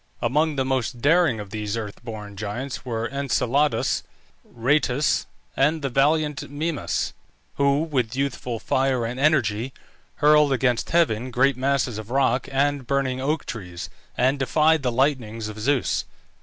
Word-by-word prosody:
Among 150 +6 +1
the 135 -1 0
most 130 -2 -1
daring 155 -3 +3
of 100 -2 -8
these 105 0 -3
earth 105 0 -6
born 105 -3 -7
giants 110 +6 -5
were 115 -2 -2
Enceladus, 140 +1 +1 0.4
Rhoetus, 130 +3 +1 0.3
and 150 +3 +2
the 135 - 0
valiant 150 +2 +1
Mimas, 150 +2 -2 0.4
who, 140 +2 +3
with 130 -7 -1
youthful 130 -3 -2
fire 130 0 0
and 120 +3 -4
energy, 130 -5 +2 0.4
hurled 150 -1 +5
against 125 -2 +1
heaven 130 -8 +2
great 135 +2 +3
masses 130 -3 0
of 110 0 -9
rock 130 -1 +1
and 140 -1 0
burning 130 -1 0
oak 150 +3 -1
trees, 90 -6 -7 0.3
and 130 +3 +2
defied 155 +4 +3
the 125 -2 0
lightnings 115 -4 0
of 110 0 -8
Zeus. 130 +3 +1
130 Hz, 140 wpm, -24 LUFS, 115-145 Hz, 0.4 s, hurled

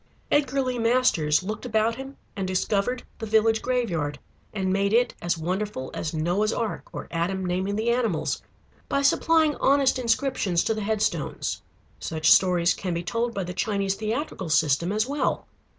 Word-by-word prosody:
Edgar 275 -2 +2
Lee 250 -1 -2
Masters 230 -11 +2
looked 215 +3 -5
about 220 -1 +1
him 270 +3 -8 0.2
and 195 -2 -2
discovered 200 +6 0 0.2
the 225 - -4
village 220 +1 +3
graveyard, 180 -13 -1 0.3
and 190 -2 -1
made 200 +1 +1
it 245 +2 +3
as 175 0 0
wonderful 180 -4 -3
as 155 - -3
Noah's 175 +7 0
Ark, 225 -2 -3
or - - -7
Adam 180 +3 -1
naming 185 +3 -1
the 225 +2 +1
animals, 230 -9 0 0.5
by 280 - +1
supplying 315 +1 +3
honest 270 -1 +3
inscriptions 230 -7 +1
to 225 - +1
the 215 - -4
headstones. 215 0 -1 0.4
Such 155 -1 +1
stories 180 -2 +5
can 180 -3 -3
be 170 - -2
told 230 +6 -2
by 195 - -1
the 180 +1 -5
Chinese 200 0 0
theatrical 215 - -3
system 160 +2 +2
as 215 +2 +1
well. 285 +3 -1
210 Hz, 165 wpm, -25 LUFS, 180-240 Hz, 0.5 s, stories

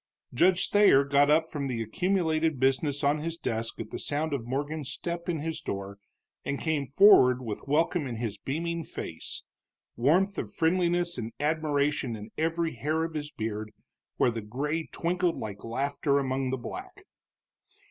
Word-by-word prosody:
Judge 180 +7 +4
Thayer 205 -9 +6
got 140 +1 +3
up 155 +2 +5
from 140 -2 -2
the 125 -3 -2
accumulated 160 - 0
business 135 +2 +1
on 145 +2 +3
his 165 +2 -4
desk 115 -6 -3
at 110 -1 -6
the - - -4
sound 150 +1 -1
of 120 -4 -3
Morgan's 145 +2 -3
step 170 0 -4
in 165 -4 -1
his 160 +1 -3
door, 100 +1 -5 0.4
and 140 - -2
came 155 -4 -1
forward 135 -6 +7
with 110 -4 -4
welcome 155 +1 +1
in 120 - -4
his 110 -3 -4
beaming 165 +7 -2
face, 80 - -6 0.5
warmth 180 +11 +2
of - - -4
friendliness 175 -1 +1
and 115 0 -4
admiration 145 -4 0
in 105 +1 -9
every 165 +1 0
hair 155 +7 -1
of 165 0 -4
his 150 -1 -4
beard, 110 -4 -4 0.5
where 120 - +3
the 115 -1 -4
gray 145 +9 -3
twinkled 175 0 0
like 100 -2 -6
laughter 140 +4 0
among 135 -1 0
the 130 - -1
black. 375 - -8
145 Hz, 165 wpm, -28 LUFS, 125-165 Hz, 0.5 s, forward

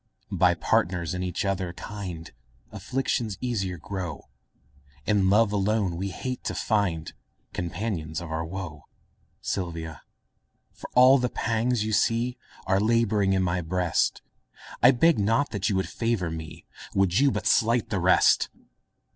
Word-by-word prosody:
By - - +4
partners 85 -1 0
in 90 - -3
each 90 +1 -2
other 95 -3 -1
kind 90 -4 -7 0.4
Afflictions 110 0 -2
easier 95 -8 -2
grow; 90 -1 -6 0.8
In 100 -3 +3
love 105 +1 +4
alone 100 -2 0
we 95 +3 -3
hate 125 +7 -5
to - - -2
find 95 -8 0 0.4
Companions 85 -3 -3
of 85 -2 -8
our 80 +1 -2
woe. 80 -3 -7 0.6
Sylvia, 80 -4 -4 0.7
for - - -10
all 130 +2 +7
the 125 0 0
pangs 115 0 0
you 110 - -2
see 115 +3 +1 0.3
Are 95 +1 +2
labouring 110 -3 +2
in 95 -1 +2
my 90 0 0
breast, 90 0 0 0.6
I 125 - +8
beg 140 +3 +4
not 110 -1 +1
you 100 - 0
would 95 - 0
favour 115 -8 -1
me, 80 -1 -8 0.3
Would 95 +1 +3
you 140 0 +5
but - - -3
slight 115 0 +2
the 100 - 0
rest! 90 +1 +4
95 Hz, 140 wpm, -26 LUFS, 90-115 Hz, 0.8 s, I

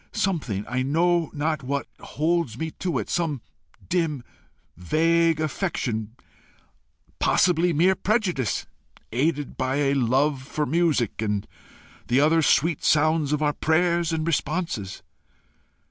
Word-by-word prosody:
Something, 130 - -1
I 125 +1 -1
know 165 +4 +1
not 155 +1 -2
what, 140 +2 -2
holds 160 -6 -1
me 160 +3 -3
to 175 -6 -1
it - - -3
some 155 -8 -2 0.4
dim 160 -7 -1 0.5
vague 165 - +2
affection, 125 - -2 1.0
possibly 175 0 +3
mere 170 +5 +4
prejudice, 185 - -1 0.5
aided 145 +4 -1
by 130 +1 -1
a 140 -1 +1
love 135 +2 +1
for 150 +3 -3
music, 150 - 0
and 105 -2 -1 0.6
the 125 +3 +3
other 160 +3 +4
sweet 155 +1 +2
sounds 155 -1 +2
of 150 0 0
our 150 0 +2
prayers 170 +1 +1
and 160 -1 -1
responses. 155 - -2
155 Hz, 120 wpm, -24 LUFS, 130-170 Hz, 1.0 s, mere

